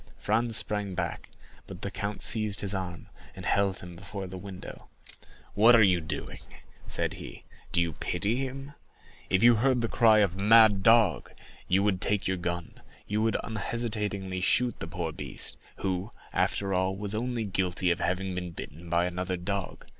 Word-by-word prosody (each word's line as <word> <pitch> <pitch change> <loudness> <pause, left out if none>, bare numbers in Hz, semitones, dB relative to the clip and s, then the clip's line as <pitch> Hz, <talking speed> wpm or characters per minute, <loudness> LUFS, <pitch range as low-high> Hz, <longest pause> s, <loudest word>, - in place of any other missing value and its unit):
Franz 115 +1 +1
sprang 105 -3 0
back, 85 -2 -4 0.4
but 95 -1 -9
the 100 - -3
count 100 +1 -4
seized 110 -2 +2
his 100 0 -1
arm, 90 -3 -5 0.3
and - - -8
held 100 -2 +1
him 90 0 -9
before 100 +2 -7
the 95 0 -8
window. 95 0 -9 0.7
"What 115 +4 +7
are 115 - +7
you 90 -3 +4
doing?" 80 - -5 0.5
said - - -1
he. - - -10 0.3
"Do - - +3
you 85 -1 0
pity 100 +8 0
him? 135 +2 -5 0.6
If 95 +2 +2
you 120 -1 +7
heard 125 +1 +2
the 115 - 0
cry 110 -1 +5
of 95 -3 +1
'Mad 105 0 +6
dog!' 115 -2 +4 0.4
you 95 +2 +3
would 95 -3 +1
take 105 +1 +1
your 95 0 0
gun—you 90 +4 -5
would 110 0 +2
unhesitatingly 105 -4 -3
shoot 120 +6 +1
the - - -5
poor 85 -4 -3
beast, - - -6 0.2
who, 95 +2 -2 0.2
after 100 -1 0
all, 95 +1 +1
was 100 0 -3
only 120 0 -2
guilty 95 -2 0
of 85 - -1
having 95 +2 -1
been 90 -1 -4
bitten 80 +3 -9
by 85 +1 +2
another 90 +1 -2
dog. 95 +1 -4
100 Hz, 170 wpm, -28 LUFS, 90-110 Hz, 0.7 s, What